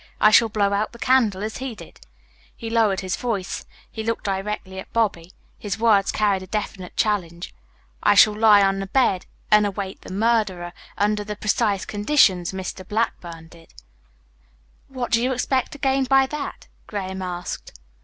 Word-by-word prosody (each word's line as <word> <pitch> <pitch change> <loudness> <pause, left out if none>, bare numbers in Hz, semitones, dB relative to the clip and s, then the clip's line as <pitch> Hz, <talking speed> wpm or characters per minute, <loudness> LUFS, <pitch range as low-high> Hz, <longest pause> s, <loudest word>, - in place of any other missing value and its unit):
I 215 - +6
shall 225 +1 +6
blow 205 -1 +1
out 210 +3 -1
the - - -11
candle 230 -6 +2
as 215 0 -4
he 260 -3 -5
did." - - -14 0.6
He 225 -2 -7
lowered 220 -4 +2
his 185 -1 -2
voice. 210 -7 -4 0.2
He 220 - -5
looked 230 0 -2
directly 195 -1 -4
at - - -10
Bobby. 195 -7 0 0.3
His 205 -3 -4
words 215 -3 +3
carried 205 -3 +1
a 185 - -10
definite 195 -2 -5
challenge. 175 -5 -1 0.5
"I 205 - +4
shall 210 +1 +7
lie 210 -2 +6
on 195 0 +1
the 195 - -4
bed 195 -5 +1 0.2
and 210 0 +6
await 195 -1 -5
the - - -10
murderer 200 -4 0 0.2
under 210 +1 +1
the 210 0 -5
precise 205 -1 0
conditions 205 -5 +2
Mr. 190 0 -6
Blackburn 175 -7 -3
did." 165 - -18 1.1
"What 255 -2 -5
do 230 -1 +3
you 255 +2 +1
expect 260 +1 -1
to - - -8
gain 270 -1 +1
by 270 +1 +4
that?" 285 +1 -6 0.2
Graham 190 -2 -5
asked. 175 - -6
210 Hz, 170 wpm, -22 LUFS, 190-230 Hz, 1.1 s, shall